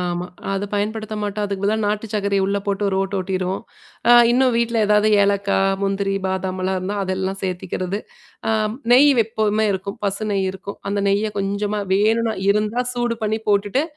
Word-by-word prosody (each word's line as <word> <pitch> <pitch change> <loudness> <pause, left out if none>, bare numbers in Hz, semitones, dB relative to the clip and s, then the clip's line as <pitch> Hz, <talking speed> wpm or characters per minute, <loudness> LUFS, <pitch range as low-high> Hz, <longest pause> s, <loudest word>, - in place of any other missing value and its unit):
ஆமா. 175 0 -2 0.3
அத 195 +1 -1
பயன்படுத்த 215 +1 -2
மாட்டோம், 205 0 -2
அதுக்கு 200 -1 -4
பதிலா 205 +2 +2
நாட்டு 210 +2 -1
சர்க்கர 200 -1 0
உள்ள 200 +1 0
போட்டு 200 0 -1
ஒரு 190 - -1
ஓட்டு 195 +1 -2
ஓட்டிருவோம். 185 0 -2 0.5
அ - - +8 0.2
இன்னும் 255 +1 +3
வீட்ல 235 0 0
ஏதாவது 210 +1 +4
ஏலக்காய், 200 -1 +2
முந்திரி, 195 0 0
பாதாமலாம் 190 0 -2
இருந்தா 190 +3 -3
அதெல்லாம் 190 +1 -2
சேர்த்திக்கிறது. 185 +1 -3 0.5
அ - - +3 0.4
நெய் 280 +4 +7
எப்பவுமே 220 -1 +1
இருக்கும். 195 +1 -5
பசு 200 +2 -1
நெய் 195 -2 0
இருக்கும். 190 +1 -8
அந்த 200 0 0
நெய்ய 205 +2 +1
கொஞ்சமா 200 +1 -1
வேணுனா 220 +3 +2 0.2
இருந்தா 210 +4 +1
சூடு 240 -1 -1
பண்ணி 215 +1 0
போட்டுட்டு, 205 +6 +2
200 Hz, 165 wpm, -21 LUFS, 195-215 Hz, 0.5 s, அ